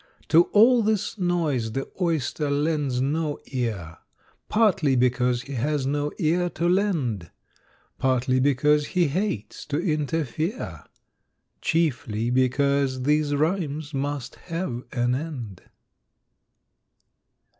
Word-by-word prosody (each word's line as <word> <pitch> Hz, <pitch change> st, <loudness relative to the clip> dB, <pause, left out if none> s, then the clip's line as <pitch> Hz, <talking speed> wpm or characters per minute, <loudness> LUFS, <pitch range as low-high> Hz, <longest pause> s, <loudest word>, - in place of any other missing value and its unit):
"= -, -, -30 dB
To 170 Hz, +2 st, +6 dB
all 235 Hz, +3 st, +5 dB
this 215 Hz, -1 st, -1 dB
noise 155 Hz, -11 st, 0 dB
the 135 Hz, 0 st, -3 dB
Oyster 155 Hz, -3 st, 0 dB
lends 145 Hz, -3 st, 0 dB
no 150 Hz, +2 st, -1 dB
ear, 110 Hz, -11 st, -3 dB, 0.5 s
`Partly 195 Hz, -, +3 dB
because 125 Hz, 0 st, +2 dB
he 140 Hz, -, -8 dB
has 140 Hz, +2 st, -1 dB
no 145 Hz, +1 st, -1 dB
ear 175 Hz, +1 st, +1 dB
to 170 Hz, +1 st, -1 dB
lend, 160 Hz, -, 0 dB, 0.7 s
Partly 130 Hz, 0 st, +2 dB
because 145 Hz, +2 st, +3 dB
he 175 Hz, -4 st, +4 dB
hates 145 Hz, -, -3 dB
to 145 Hz, -, -1 dB
interfere, 160 Hz, -, -2 dB, 0.8 s
`Chiefly 130 Hz, -8 st, 0 dB
because 130 Hz, 0 st, +1 dB
these 150 Hz, +1 st, +2 dB
rhymes 155 Hz, -1 st, -1 dB
must 140 Hz, -2 st, -3 dB
have 165 Hz, -8 st, -3 dB
an 120 Hz, -1 st, +1 dB
end. 130 Hz, -, -5 dB
145 Hz, 110 wpm, -25 LUFS, 130-165 Hz, 0.8 s, To